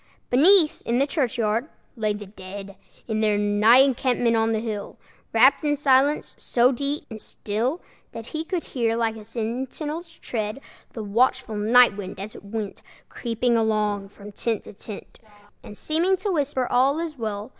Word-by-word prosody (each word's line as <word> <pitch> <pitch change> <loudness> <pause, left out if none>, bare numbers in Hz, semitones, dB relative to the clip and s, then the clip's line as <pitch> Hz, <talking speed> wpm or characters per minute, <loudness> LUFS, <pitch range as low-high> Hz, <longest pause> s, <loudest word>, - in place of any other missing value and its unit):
Beneath, 315 +5 +5
in 235 - -1
the 275 - +3
churchyard, 240 -3 -1 0.3
lay 215 -3 0
the 205 0 -5
dead, 195 0 -9 0.3
In 220 -2 -1
their 210 -1 +2
night 210 +5 +5
encampment 245 -3 +1
on 225 0 +2
the 220 -1 +1
hill, 215 -3 -5 0.3
Wrapped 260 +6 +5
in 295 -1 +2
silence 280 +1 +2
so 245 +1 +3
deep 280 +3 -2
and 220 -1 -7
still 235 +11 -3 0.3
That 230 - -8
he 310 +5 -4
could 345 0 -3
hear, 230 -3 -1
like 225 -1 0
a 220 - -10
sentinel's 265 +9 -4
tread, 215 +1 -4 0.3
The 220 - -5
watchful 225 +2 +1
night 225 +1 +5
wind, 190 -2 -7
as 205 +2 -6
it - - -11
went 205 0 -5 0.3
Creeping 235 0 -1
along 210 -3 0
from 205 +1 -12
tent 225 +1 -2
to - - -11
tent, 205 +1 -10 0.4
And 210 - -11
seeming 345 +5 +1
to 395 +2 -2
whisper, 285 -5 0
"All 265 +4 +2
is 320 -5 -5
well!" 215 0 -4
230 Hz, 165 wpm, -24 LUFS, 210-275 Hz, 0.4 s, Beneath